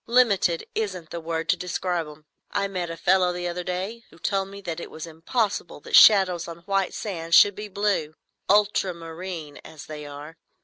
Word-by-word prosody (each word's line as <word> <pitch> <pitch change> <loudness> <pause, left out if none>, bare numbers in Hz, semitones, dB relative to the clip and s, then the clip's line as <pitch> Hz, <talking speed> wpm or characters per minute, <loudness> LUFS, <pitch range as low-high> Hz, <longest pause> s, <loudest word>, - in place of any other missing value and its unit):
Limited 205 -8 +3
isn't 185 -7 -3
the 170 - -4
word 165 0 -3
to - - +5
describe 180 -2 -2
'em. 150 0 -13 0.2
I 200 0 0
met 180 -3 -3
a 165 - -6
fellow 180 +1 +3
the 175 0 -3
other 175 +1 -3
day 190 +6 -4
who - - -18
told 195 +2 -1
me 200 +1 -10
that 170 -3 -5
it - - -7
was 160 - -7
impossible 170 +5 -2
that - - -1
shadows 190 -5 +7
on 170 0 -9
white 195 0 -1
sand 170 -5 -1
should 205 - +8
be 210 +2 -7
blue,—ultramarine,—as 175 -4 -2
they 150 -1 -8
are. 145 +3 -10
180 Hz, 175 wpm, -25 LUFS, 165-195 Hz, 0.2 s, should